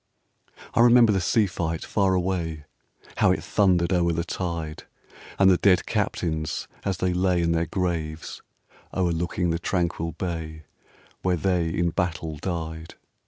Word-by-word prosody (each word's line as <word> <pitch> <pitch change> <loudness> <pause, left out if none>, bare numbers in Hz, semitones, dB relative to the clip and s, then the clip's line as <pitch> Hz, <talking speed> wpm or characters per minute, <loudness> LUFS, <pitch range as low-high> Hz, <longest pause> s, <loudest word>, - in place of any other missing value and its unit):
I - - 0
remember 120 -1 +7
the 95 -2 +1
sea 105 +5 +3
fight 85 -4 -3
far 95 -2 +1
away, 85 -4 -2 0.5
How - - +4
it - - -1
thundered 90 -3 +2
o'er 85 -1 +2
the 85 +1 -1
tide! 85 -3 -4 0.5
And 95 - +5
the 95 -2 +6
dead 95 -2 +3
captains, 80 -2 -2 0.2
as 95 -3 -1
they 90 0 0
lay 90 0 +2
In 85 - +1
their 85 0 +1
graves, 80 -4 -3 0.5
o'erlooking 85 -1 0
the 85 - -1
tranquil 85 -2 -1
buy 80 -3 -5 0.6
Where 90 -1 +1
they 90 -2 +1
in 85 +1 0
battle 80 -3 -2
died. 80 -1 -5
85 Hz, 145 wpm, -25 LUFS, 80-95 Hz, 0.6 s, remember